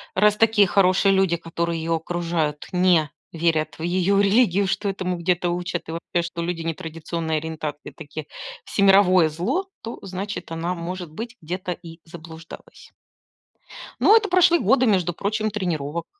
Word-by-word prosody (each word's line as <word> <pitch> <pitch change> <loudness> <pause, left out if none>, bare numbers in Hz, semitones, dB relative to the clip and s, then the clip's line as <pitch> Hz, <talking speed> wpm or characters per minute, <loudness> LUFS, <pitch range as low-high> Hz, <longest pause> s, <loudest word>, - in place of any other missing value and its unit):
раз 210 +2 +4
такие 220 -3 +4
хорошие 195 +1 +3
люди, 190 -3 +2
которые 170 0 -3
её 165 0 0
окружают, 165 -3 -2
не 180 -4 +3 0.2
верят 160 -2 0
в - - -5
её 185 +3 +2
религию, 200 -1 +3
что 200 +1 -1
этому 185 -2 -3
где-то 175 0 0
учат, 175 -1 -4
и - - -3
вообще, 170 +1 -2
что 170 0 -5
люди 170 -1 -3
нетрадиционной 165 -1 -3
ориентации 155 -2 -5
такие 155 -1 -9 0.4
всемировое 195 -4 +4
зло, 230 - -2
то 230 - -7
значит 195 -1 -6
она 165 +2 -2
может 175 -1 -6
быть 230 +8 -7
где-то 180 +2 -4
и 165 0 -13
заблуждалась. 165 0 -12 1.1
Но 430 - +6
это 440 -2 +3
прошли 355 -2 +5
годы, 255 +5 +3
между 185 -6 +2
прочим, 215 +4 -1
тренировок. 170 -6 -3
175 Hz, 150 wpm, -23 LUFS, 165-195 Hz, 1.1 s, Но